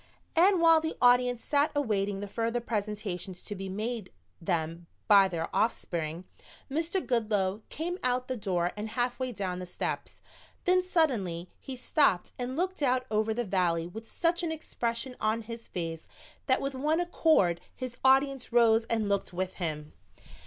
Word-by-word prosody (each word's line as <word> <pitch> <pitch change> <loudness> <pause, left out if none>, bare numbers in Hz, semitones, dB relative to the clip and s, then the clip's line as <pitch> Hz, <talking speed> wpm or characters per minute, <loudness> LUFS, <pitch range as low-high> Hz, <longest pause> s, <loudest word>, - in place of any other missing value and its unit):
And 365 +3 +5
while 330 -1 +6
the 320 0 -3
audience 245 -1 +4
sat 290 0 +2
awaiting 205 -7 0
the 205 - -4
further 230 +3 -1
presentations 205 -5 -3
to - - -5
be 195 -1 -6
made 215 +1 -3 0.3
them 165 0 -2 0.2
by 200 -3 +7
their 165 -3 -4
offspring, 170 -6 -1 0.5
Mr. 330 +5 0
Goodloe 210 -4 +1
came 350 +4 -3
out 250 0 0
the 260 - -2
door 180 -5 0
and 210 +1 -4
halfway 250 +2 -1
down 185 -5 -3
the 180 - -6
steps. - - -4 0.4
Then 365 0 +4
suddenly 230 - 0
he 265 - -7
stopped 250 - +2
and 250 +2 -3
looked 370 0 -1
out 255 -2 +2
over 215 +1 +1
the 240 +2 -1
valley 175 -4 +1
with 225 +6 -9
such 340 +1 0
an 335 -2 -1
expression 250 -5 -3
on 220 +1 0
his 230 +1 -8
face 165 -2 -4 0.4
that 260 -1 +3
with 275 0 -2
one 300 +5 +1
accord 315 - +3
his 255 -2 -6
audience 270 -1 +3
rose 230 -1 +5
and 225 -3 0
looked 200 -2 -1
with 185 +1 -2
him. 150 -3 -3
230 Hz, 160 wpm, -29 LUFS, 190-265 Hz, 0.5 s, by